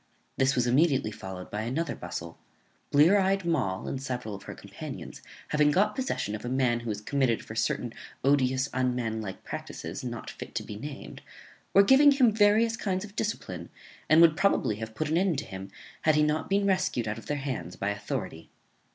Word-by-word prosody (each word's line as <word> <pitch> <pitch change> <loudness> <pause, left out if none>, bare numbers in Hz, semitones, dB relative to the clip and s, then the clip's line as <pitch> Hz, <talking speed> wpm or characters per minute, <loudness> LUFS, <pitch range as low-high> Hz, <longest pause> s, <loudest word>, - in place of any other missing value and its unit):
This 135 +1 +2
was 125 -1 +2
immediately 130 -2 +3
followed 95 -3 -8
by 105 - -2
another 130 +9 -2
bustle; 85 -1 -7 0.5
Blear 160 +8 +6
eyed 195 -1 +1
Moll, 120 - 0
and 135 - -3
several 125 -5 -4
of 100 - -7
her - - -7
companions, - - -8 0.3
having 150 -1 +4
got 205 +7 +3
possession 255 - -2
of 105 - -5
a 120 - -3
man 125 -2 +2
who 120 -1 -6
was 105 -1 -3
committed 130 -1 0
for - - -8
certain - - -1 0.3
odious 130 -1 +3
unmanlike 115 -5 -2
practices, - - -6
not 120 -2 -5
fit - - -10
to - - -1
be 105 - -8
named, 140 +6 -8 0.5
were 200 - +7
giving 280 +6 +7
him 255 -4 +4
various 220 +2 +4
kinds 195 -3 -2
of 205 0 -14
discipline, 90 - -4 0.4
and 155 +2 +7
would 165 -2 +7
probably 190 - +2
have 110 0 -7
put 155 - -1
an 160 +2 +2
end 185 -5 +1
to 145 - -3
him, 95 -1 -8 0.3
had 155 -1 +3
he 150 - +4
not 150 +1 0
been 200 +1 +2
rescued 185 - +1
out 105 +2 -3
of - - -14
their 145 - -1
hands 135 -10 -4
by 100 +1 -1
authority. 90 -5 -5
135 Hz, 195 wpm, -28 LUFS, 110-185 Hz, 0.5 s, were